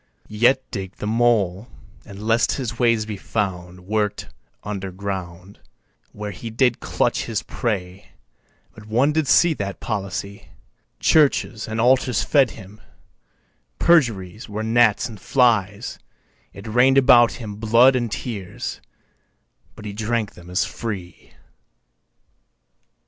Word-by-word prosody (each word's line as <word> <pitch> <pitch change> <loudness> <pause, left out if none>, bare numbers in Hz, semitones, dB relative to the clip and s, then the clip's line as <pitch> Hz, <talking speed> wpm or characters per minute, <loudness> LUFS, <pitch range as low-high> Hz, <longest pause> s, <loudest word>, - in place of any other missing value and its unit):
Yet 120 +5 +2
digg'd 95 -4 -6
the - - -6
mole, 110 -3 +1 0.4
and 100 +2 -10
lest 115 +2 +2
his 120 -3 -4
ways 115 -3 +2
be 105 -2 -6
found 90 -4 -4
Work'd 105 +2 -2 0.3
under 100 -2 -5
ground, 95 -1 -7 0.5
Where 105 0 -6
he 115 +5 -8
did 120 +2 +1
clutch - - -1
his - - -3
prey, 95 -4 -4 0.6
but 105 -1 -14
one 125 +7 +2
did 155 -2 0
see 170 +4 +5
That 100 -7 -5
policy, 100 -1 -5 0.5
Churches 140 -7 +2
and 110 0 -4
altars 125 +1 +3
fed 140 -4 +3
him, 105 +1 -13 1.0
perjuries 115 - +1
Were 105 +1 -4
gnats 110 -1 +3
and 110 -4 -11
flies, 115 -4 +1 0.5
It 100 - -12
rain'd 125 +5 +3
about 125 -3 +6
him 105 -4 -8
blood 115 +4 +5
and 120 -3 -1
tears, 105 -6 -5 0.9
but 105 - -11
he 105 - -5
Drank 110 0 -2
them 90 0 -14
as 90 +2 0
free. 95 -6 -7
110 Hz, 125 wpm, -22 LUFS, 100-120 Hz, 1.0 s, about